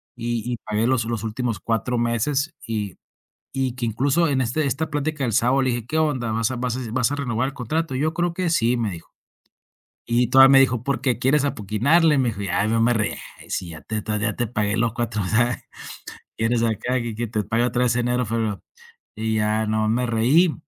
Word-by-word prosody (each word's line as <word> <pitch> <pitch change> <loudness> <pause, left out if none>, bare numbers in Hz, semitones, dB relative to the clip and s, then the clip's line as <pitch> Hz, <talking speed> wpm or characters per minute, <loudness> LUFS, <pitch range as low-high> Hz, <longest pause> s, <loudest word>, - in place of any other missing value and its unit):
y 120 0 -2
y 120 - -2
pagué 110 +1 -1
los 125 -3 +1
los 115 -2 -3
últimos 115 -1 -2
4 115 +4 -1
meses, 135 +7 0
y 105 -5 -3 0.6
y 130 -2 -1
que, 125 -2 -3
incluso, 140 +9 +1
en 135 -2 +1
este 130 +5 0
esta 140 +4 -1
plática 150 -1 -2
del 115 - -1
sábado 125 +4 +3
le 130 -1 +1
dije: 120 -2 -3
"¿Qué 155 - -2
onda, 140 -7 0
vas 115 +1 0
a - - -3
vas 125 0 -2
a - - -4
vas 125 0 +1
a - - 0
renovar 125 -2 -1
el - - -12
contrato?" 150 +4 -2
"Yo 155 +4 0
creo 175 0 -1
que 180 0 -1
sí", 125 -6 +2
me 115 -4 -1
dijo. 85 -2 -10 0.9
Y 120 +1 +2
todavía 135 +2 +7
me 135 0 +7
dijo: 125 -3 +1
"¿Por 140 +1 -1
qué, 130 -3 0
quieres 140 +2 +2
apuquinarle?", 140 - +2
me 130 -3 +2
dijo. 105 -3 -6
Ya, 100 +1 0
yo 115 +1 +1
me 115 +2 +3
reí: 110 -2 0
"Ah, - - -12
sí, 90 - -3
ya 80 -2 -9
te 110 -1 -4
ya 105 -1 -1
te 120 - 0
pagué 105 -1 -1
los 115 0 +1
4" 115 -3 -2
"Ah, 120 +5 +1 0.8
¿quieres 115 +1 +1
sacar 115 +2 0
que 115 -2 -4
que 120 +2 -3
te 105 -1 -2
pague 115 +4 +1
otra 125 0 0
vez 125 -2 +2
enero, 125 +1 +1
febrero?" 110 -2 -2 0.5
Y 110 0 -1
ya 110 +1 +1
no 110 0 +1
me 120 +3 +1
reí 130 +9 +3
120 Hz, 220 wpm, -23 LUFS, 110-135 Hz, 0.9 s, todavía